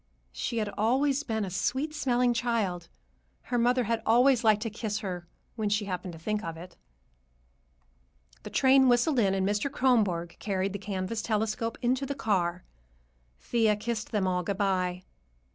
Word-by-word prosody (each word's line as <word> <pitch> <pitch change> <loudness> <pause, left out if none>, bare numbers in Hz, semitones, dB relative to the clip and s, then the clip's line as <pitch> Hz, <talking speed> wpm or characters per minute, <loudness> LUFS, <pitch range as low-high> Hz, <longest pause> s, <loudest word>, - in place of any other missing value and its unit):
She 235 - -3
had 215 -2 0
always 265 +6 +2
been 220 -6 -2
a 185 - -6
sweet 265 - -1
smelling 250 -4 +1
child. 220 -8 -1 0.5
Her 245 -1 -1
mother 245 +2 +3
had 230 0 -1
always 245 +2 +4
liked 215 -1 +4
to 225 - -3
kiss 215 -1 -3
her, 180 -2 -5 0.3
when 215 -3 -1
she 205 0 0
happened 180 -2 -4
to - - -9
think 210 +5 -2
of 165 -5 -5
it. 175 +1 -11 1.7
The - - -8
train 265 0 +5
whistled 245 +3 +3
in, 195 -3 +2
and 190 0 0
Mr. 210 +7 0
Kronborg 205 -11 +1
carried 195 -1 -1
the 200 - -4
canvas 195 +2 -3
"telescope" 220 +1 -1
into 260 +3 +1
the 280 - -3
car. 180 -8 0 0.8
Thea 225 -3 +2
kissed 215 +1 -4
them 205 -3 0
all 180 -1 +1
good 190 +2 -3
bye. 185 -2 0
215 Hz, 165 wpm, -28 LUFS, 190-240 Hz, 1.7 s, train